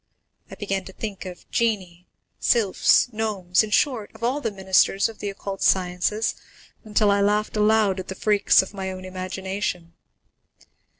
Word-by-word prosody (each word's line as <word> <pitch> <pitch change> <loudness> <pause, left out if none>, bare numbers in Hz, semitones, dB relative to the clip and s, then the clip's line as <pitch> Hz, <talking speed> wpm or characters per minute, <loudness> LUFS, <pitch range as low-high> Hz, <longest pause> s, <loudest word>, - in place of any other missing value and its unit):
I - - -9
began 195 -2 -3
to 190 - -11
think 200 -3 -6
of 180 -1 -11
genii, 185 -7 -1 0.3
sylphs, 230 +2 +3
gnomes, 200 -5 +1
in 215 - -3
short, 225 -1 +1
of 220 - -12
all 260 +5 0
the 230 - -1
ministers 190 0 +2
of 225 - -11
the 205 - -3
occult 195 0 -6
sciences, 185 +4 +1 0.5
until 210 -1 +2
I 200 0 +2
laughed 210 +2 +1
aloud 210 -2 +3
at 185 - -7
the 190 - -6
freaks 205 -1 +3
of 190 - -11
my 190 -1 -4
own 185 0 -8
imagination. 185 -1 -4
200 Hz, 160 wpm, -23 LUFS, 185-215 Hz, 0.5 s, sylphs